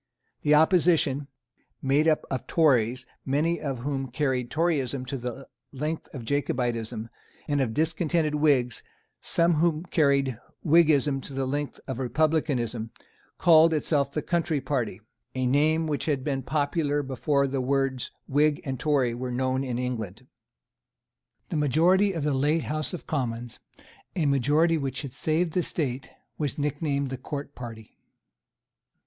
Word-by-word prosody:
The 150 0 +4
opposition, 155 -4 +3 0.5
made 140 +4 +2
up 155 -1 +2
of 130 - -3
Tories 125 -6 +2 0.2
many 155 +5 +1
of 135 -3 -2
whom 135 0 -2
carried 130 -2 -1
Toryism 140 -5 0
to 130 - -4
the 125 +2 -6 0.2
length 150 +4 -4
of 125 -5 -7
Jacobitism, 120 -4 -1 0.4
and 145 -1 +1
of 115 -4 -1
discontented 160 0 +1
Whigs 140 -5 +2 0.4
some 170 +1 +3
of 160 - +1
whom 160 0 +1
carried 140 -8 +1 0.3
Whiggism 150 -4 +4
to 135 - -8
the 135 0 -1
length 145 +2 -3
of 130 -2 -4
republicanism, 130 -5 0 0.5
called 160 -1 +6
itself 145 -2 +1
the 150 - -3
Country 165 -3 0
party, 120 -8 -2 0.3
a 130 0 0
name 155 +5 +3
which 150 -2 -2
had 140 -4 0
been 135 -2 -1
popular 145 +1 0
before 140 +1 0
the 135 -1 -1
words 135 -1 0 0.2
Whig 145 +1 +2
and 130 -2 -4
Tory 135 -6 +1
were 125 +2 -4
known 130 +1 0
in 125 -3 -3
England. 120 -3 -4 1.2
The - - -2
majority 170 +8 +3
of 165 -4 -3
the 150 -1 +1
late 150 +4 +1
House 155 0 -2
of - - -10
Commons, 120 -5 -3 0.6
a 170 -5 +1
majority 150 +4 +3
which 135 -2 -3
had 135 -3 -7
saved 160 +1 0
the 180 - +2
State, 135 -6 -3 0.3
was 145 -3 -2
nicknamed 145 -1 -1
the 130 - -3
Court 140 +2 -6
party. 115 -3 -10
140 Hz, 145 wpm, -26 LUFS, 130-155 Hz, 1.2 s, called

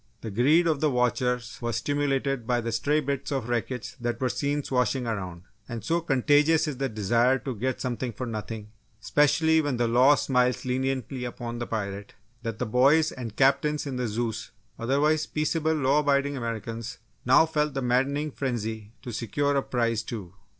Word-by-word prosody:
The 110 - -5
greed 145 - +4
of 160 -4 +1
the 155 - +2
watchers 125 -1 0
was 120 -2 -2
stimulated 135 -1 -1
by 125 -1 +2
the 115 0 -3
stray 145 +7 +1
bits 140 0 -3
of 135 -4 -2
wreckage 120 0 -3
that 120 -1 -2
were 130 - 0
seen 145 +2 -1
swashing 125 -1 0
around, 95 -6 -4 0.3
and 115 -3 -5
so 170 +8 +1
contagious 150 +2 +3
is 145 -4 -3
the 135 0 -1
desire 115 +4 +2
to 135 0 -5
get 125 +3 -2
something 125 0 -3
for 125 +4 -5
nothing, 110 -2 -6 0.3
especially 150 +6 +3
when 145 -4 -1
the 120 0 +1
law 125 +5 +5
smiles 125 -3 +1
leniently 130 0 -2
upon 120 -1 -5
the 120 - -4
pirate, 100 -2 -4 0.3
that 115 -2 -4
the 125 - -2
boys 140 +8 +4
and 115 -5 -7
Captains 140 +3 +2
in 135 -3 -4
the 125 -1 -1
Zeus 110 0 -3 0.3
otherwise 150 +6 +1
peaceable 160 +1 0
law 140 0 +3
abiding 140 -1 +1
Americans, 115 -1 -5 0.3
now 130 +6 +6
felt 150 -2 -1
the 135 - -1
maddening 140 +5 +1
frenzy 110 -5 -4
to 120 - -6
secure 130 +6 -1
a 140 - +3
prize, 115 -4 0
too. 105 -6 -7
125 Hz, 180 wpm, -27 LUFS, 115-145 Hz, 0.3 s, now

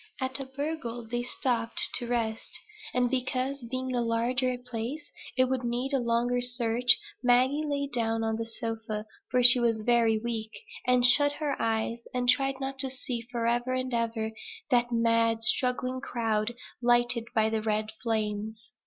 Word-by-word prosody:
At 260 0 -1
Abergele 265 -3 -5
they 240 +1 -2
stopped 240 -2 0 0.2
to 240 - -5
rest; 225 -2 -3 0.3
and 250 0 +1
because, 260 +2 -2
being 255 +2 -4
a 245 - +1
larger 245 +2 0
place, 250 +4 -6 0.3
it 255 - +5
would 255 -1 -2
need 245 +3 -2
a 270 - +3
longer 240 +1 0
search, 245 0 +2 0.2
Maggie 255 +4 +3
lay 285 -2 -1
down 225 -4 -1
on 220 0 -1
the 225 0 -4
sofa, 225 -2 -4 0.2
for 250 +1 +2
she 245 +1 +9
was 230 -2 +1
very 230 -1 +3
weak, 220 -1 -3 0.4
and 250 -1 +4
shut 285 +3 +5
her 290 -1 -2
eyes, 225 +1 -1
and 250 0 -1
tried 270 +1 +2
not 270 0 -5
to 265 0 +2
see 255 -2 -4
forever 240 +1 0
and 255 0 -2
ever 230 -1 -1 0.4
that 240 -1 +3
mad 230 -1 +2
struggling 255 +2 +1
crowd 225 -3 -1 0.3
lighted 240 -1 +2
by 220 0 +2
the 220 -1 0
red 215 0 -1
flames. 215 -2 -3
240 Hz, 160 wpm, -28 LUFS, 230-255 Hz, 0.4 s, she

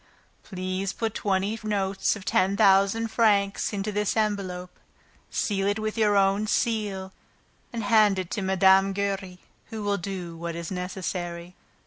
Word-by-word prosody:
Please 185 0 -4
put 225 -2 -2
twenty 200 +2 -1
notes 200 -2 0
of 200 -3 -10
a 190 +2 +2
thousand 200 +2 +4
francs 205 -3 +2
each 205 - -5
into 200 +2 -2
this 210 +1 -1
envelope, 190 -4 -1 0.6
seal 195 -2 -1
it 205 +1 +1
with 215 0 -3
your 210 -3 +3
own 195 +2 +2
seal 205 -5 -1 0.6
and 230 -2 -4
hand 210 -2 +4
it 185 -2 -4
to 210 - -2
Mme. 190 +1 +4
Giry, 195 -2 -3 0.3
who 220 -2 -7
will 205 0 0
do 175 -2 -5
what 170 0 -5
is 170 +1 -6
necessary. 180 -1 -4
195 Hz, 150 wpm, -26 LUFS, 190-210 Hz, 0.6 s, thousand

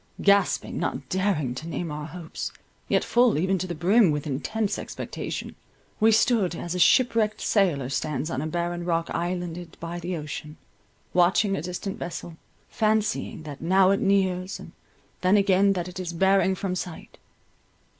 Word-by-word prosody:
Gasping, 200 0 +2
not - - -3
daring 185 -9 0
to 160 +6 -7
name 170 -1 -3
our 150 0 -5
hopes, 170 -1 -6 0.4
yet - - +2
full 240 -6 +3
even 190 +3 +1
to 185 - -3
the 175 - -4
brim 190 +5 +4
with 150 -1 -1
intense 200 +9 -2
expectation, - - -5 0.5
we 220 +1 +5
stood, 220 -5 +3
as 175 +1 -4
a 180 - -2
ship 250 +8 +5
wrecked 215 -2 +1
sailor 170 - +1
stands 150 +3 -2
on 130 - -2
a 155 - -2
barren 175 +1 -2
rock 170 -1 -1
islanded 175 0 -4
by 170 +1 -5
the 175 +1 -3
ocean, 150 0 -7 0.6
watching 190 +3 +3
a - - -3
distant 180 +3 -5
vessel, 175 -1 -6 0.3
fancying 215 -3 0
that 145 -2 -8
now 190 +3 +4
it 195 - +2
nears, 190 -1 +1
and - - -11 0.5
then 185 +3 +4
again 195 0 +4
that 175 -2 -3
it 180 +1 -8
is 175 -2 -4
bearing 190 +2 +3
from 185 0 -3
sight. 180 -2 -7
180 Hz, 165 wpm, -26 LUFS, 165-195 Hz, 0.6 s, we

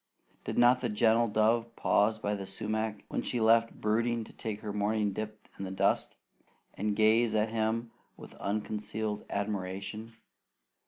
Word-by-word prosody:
Did - - -3
not 120 +1 +6
the 120 - -1
gentle 115 +2 +3
dove 115 +2 +1
pause 110 +2 +2
by 105 -1 -2
the 100 -2 -4
sumac, 110 +2 -3
when - - -2
she 125 - -2
left 115 +1 +3
brooding 115 +2 +1
to - - -14
take 110 -2 -5
her 105 -2 -4
morning 105 0 0
dip 110 +1 -6
in - - -4
the 95 - -4
dust, 95 0 +1 0.6
and 105 +1 -1
gaze 110 +1 +4
at 110 +1 +2
him 115 +1 -1 0.3
with - - -11
unconcealed 105 +1 -3
admiration? 100 +2 -4
110 Hz, 155 wpm, -30 LUFS, 105-115 Hz, 0.6 s, not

